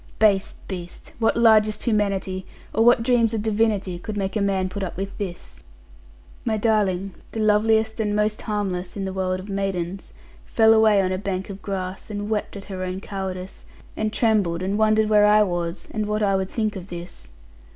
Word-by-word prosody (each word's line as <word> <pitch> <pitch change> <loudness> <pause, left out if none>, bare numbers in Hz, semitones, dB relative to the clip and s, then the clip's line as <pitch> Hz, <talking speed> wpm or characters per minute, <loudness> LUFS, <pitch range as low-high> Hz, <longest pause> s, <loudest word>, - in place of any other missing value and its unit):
Base 200 -3 +3
beast! 180 -2 -7
what 225 - +2
largest 215 -2 +4
humanity, 195 -4 0 0.3
or 220 - +3
what 240 0 +5
dreams 230 -2 +2
of 210 - -2
divinity, 210 -4 0
could 210 +3 -6
make 195 0 -2
a 215 - +1
man 195 -2 +1
put 190 +2 -6
up 185 -3 -4
with 195 +1 -4
this? 175 - -6 0.8
My 220 -2 0
darling 200 -4 +1 0.2
(the 225 - -3
loveliest, 220 +1 +2
and 210 -1 0
most 210 0 0
harmless, 195 -3 -3
in 195 - -2
the 190 - -4
world 185 -1 -1
of 185 - -9
maidens), 195 -2 -3 0.3
fell 220 -1 +4
away 215 -3 +5
on 185 - 0
a 185 - -1
bank 195 -1 -3
of 195 0 -9
grass, 190 -1 -5
and 205 0 -4
wept 210 -1 -2
at 195 - -9
her 190 -2 -6
own 185 0 -3
cowardice; 190 -2 -6 0.3
and 215 0 -1
trembled, 200 -7 +1
and 195 +2 -1
wondered 215 0 +3
where 210 -1 +5
I 210 0 +6
was; 175 -2 -3
and 215 -1 -2
what 210 0 0
I 195 -1 +2
would 190 0 -1
think 215 -2 -1
of 185 -1 -7
this. 175 - -9
200 Hz, 195 wpm, -23 LUFS, 185-215 Hz, 0.8 s, I